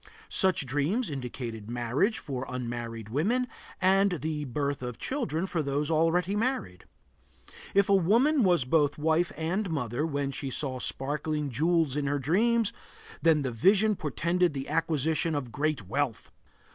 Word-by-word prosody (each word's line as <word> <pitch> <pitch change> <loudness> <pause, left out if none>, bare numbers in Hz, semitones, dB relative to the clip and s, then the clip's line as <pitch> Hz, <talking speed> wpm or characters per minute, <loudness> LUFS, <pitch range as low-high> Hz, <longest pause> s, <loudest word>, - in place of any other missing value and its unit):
Such 185 -6 +3
dreams 150 - 0
indicated 120 -5 -6
marriage 120 - 0
for 130 -3 -5
unmarried 120 -3 -5
women, 215 - +1 0.3
and 195 +1 +3
the 155 -2 -3
birth 140 +1 -2
of 125 -2 -5
children 230 - -2
for 175 -4 -1
those 145 +2 -1
already 165 +4 +2
married. 210 - -2 0.9
If 200 0 +5
a 200 - +3
woman 235 - +4
was 175 - +3
both 145 +1 +2
wife 160 +3 +1
and 180 +6 -1
mother 140 -4 -2
when 140 -3 -1
she 135 0 -4
saw 130 -1 -1
sparkling 150 +3 -1
jewels 160 +1 +1
in 145 -1 -1
her 145 +1 +1
dream, 220 - +2 0.6
then 160 -3 +4
the 130 - -2
vision 200 - +3
portended 170 +2 0
the 135 0 -4
acquisition 160 0 +1
of 130 -5 -3
great 145 -6 -1
wealth. 120 0 -2
150 Hz, 145 wpm, -28 LUFS, 135-180 Hz, 0.9 s, If